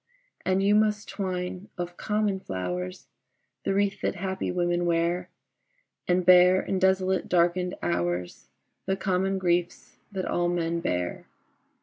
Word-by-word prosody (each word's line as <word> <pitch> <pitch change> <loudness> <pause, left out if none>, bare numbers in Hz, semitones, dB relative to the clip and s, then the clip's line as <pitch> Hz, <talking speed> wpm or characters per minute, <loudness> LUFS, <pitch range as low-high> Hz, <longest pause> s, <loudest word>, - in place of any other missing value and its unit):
And 190 +1 +1
you 200 +1 +4
must 215 0 +2
twine 185 -1 -4
of 175 0 -4
common 210 -1 0
flowers 90 - -4 0.6
The 195 - +1
wreath 200 0 0
that - - -1
happy 190 +1 -3
women 175 -1 0
wear, 170 +2 0 0.8
And 180 0 +2
bear 180 0 +7
in 190 - -2
desolate 190 0 +2
darkened 180 +1 +2
hours 85 0 -2 0.4
The 190 - +1
common 190 0 0
griefs 175 -2 -1
that 190 -2 -3
all 175 0 0
men 170 -1 -1
bear. 90 - -2
180 Hz, 130 wpm, -27 LUFS, 170-190 Hz, 0.8 s, bear